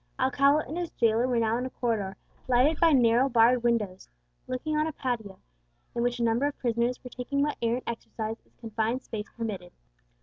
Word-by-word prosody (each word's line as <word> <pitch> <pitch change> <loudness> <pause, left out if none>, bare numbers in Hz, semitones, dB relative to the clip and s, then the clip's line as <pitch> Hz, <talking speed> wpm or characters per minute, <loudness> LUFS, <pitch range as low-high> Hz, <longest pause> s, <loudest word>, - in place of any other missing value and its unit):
Alcala 280 +3 +3
and 315 +6 -4
his 345 -2 -3
jailer 230 +1 +2
were 250 -2 +1
now 225 0 +2
in 250 - -2
a - - -7
corridor, 210 -7 -2 0.3
lighted 260 +5 +3
by 335 -1 +5
narrow 245 -1 +4
barred 240 0 +5
windows, 220 -6 -1 0.4
looking 280 +5 -2
on 305 +1 +2
a - - -2
patio, 230 -9 -4 0.6
in 235 - -1
which 245 0 0
a - - +1
number 235 +5 +2
of 290 - -5
prisoners 240 0 0
were 250 - -9
taking 280 +3 -1
what 295 - 0
air 230 0 +2
and 255 - -5
exercise 225 -1 -4
its - - -34
confined 225 +2 -2
space 215 -2 -5
permitted. 200 -6 -4
240 Hz, 200 wpm, -28 LUFS, 225-260 Hz, 0.6 s, by